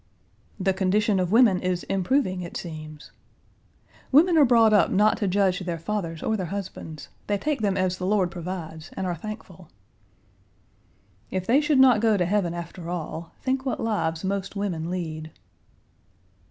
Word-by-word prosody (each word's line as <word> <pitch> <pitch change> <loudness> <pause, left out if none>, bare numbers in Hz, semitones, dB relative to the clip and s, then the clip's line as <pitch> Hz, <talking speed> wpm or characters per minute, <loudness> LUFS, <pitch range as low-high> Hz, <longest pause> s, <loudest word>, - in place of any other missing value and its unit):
"The 190 0 +1
condition 195 +2 +1
of 180 -1 -1
women 225 -5 +5
is 180 -1 -1
improving, 190 -1 0
it 170 - -6
seems." 155 -3 -9 1.0
"Women 330 +6 +5
are 300 -3 +7
brought 230 -3 +5
up 205 - +5
not 210 +3 +3
to 205 - -1
judge 190 -1 +2
their 175 -3 -3
fathers 165 -2 -4
or 220 - 0
their 185 -4 -3
husbands. 175 -5 -7 0.2
They 205 - +1
take 295 +3 -2
them 200 -2 +1
as 185 -1 0
the 185 - -2
Lord 190 -3 +2
provides 170 -3 -6
and 190 - -2
are 180 - -1
thankful." 185 -2 -9 1.6
"If 185 -1 -3
they 255 +8 +4
should 295 -2 +2
not 255 -5 +6
go 220 -2 +3
to 180 - +1
heaven 180 -2 0
after 170 0 -7
all; 165 -1 -5
think 260 0 0
what 265 - -2
lives 165 -8 -1
most 195 +1 -3
women 175 -5 -2
lead." 160 -3 -4
190 Hz, 165 wpm, -25 LUFS, 175-215 Hz, 1.6 s, are